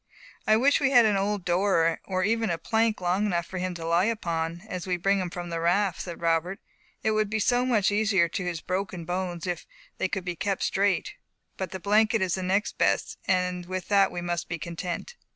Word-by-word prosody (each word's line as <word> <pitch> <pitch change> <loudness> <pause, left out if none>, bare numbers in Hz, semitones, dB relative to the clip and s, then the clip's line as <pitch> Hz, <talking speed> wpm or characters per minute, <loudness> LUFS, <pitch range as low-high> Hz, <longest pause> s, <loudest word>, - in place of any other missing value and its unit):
"I 215 - +6
wish 280 +5 +4
we 275 - +2
had 245 -4 +6
an 210 -2 +3
old 200 -1 -1
door, 175 -2 +2
or 185 -1 -1
even 225 +2 +1
a 170 - 0
plank 220 +2 0
long 185 +4 +1
enough 170 -4 0
for 185 - -6
him 185 0 -2
to 165 -1 -6
lie 170 +3 +3
upon, 170 -6 -2
as 185 -2 -5
we 180 -1 0
bring 195 +3 +2
him 180 -2 -2
from 175 0 -6
the 165 - -2
raft," 180 +2 +1
said 175 -2 -7
Robert, 170 +4 0 0.4
"it 220 - +2
would 215 -1 +1
be 215 - -1
so 245 +4 +2
much 215 -6 +3
easier 205 -4 +3
to 175 +3 -4
his 170 -2 -3
broken 185 -2 -3
bones, 175 -1 -3
if 180 -1 -4 0.3
they - - +1
could 190 -3 -4
be 180 -1 -3
kept 195 +2 -1
straight. 200 - +1 0.4
But 190 -2 -4
the 190 - -6
blanket 215 +2 +3
is 180 -2 0
next 190 +2 -1
best, - - +1
and 180 -2 0
with 185 -1 -4
that 200 -2 +4
we 175 - -4
must 175 0 -3
be 170 - -2
content." 175 - -5
185 Hz, 220 wpm, -27 LUFS, 175-205 Hz, 0.4 s, I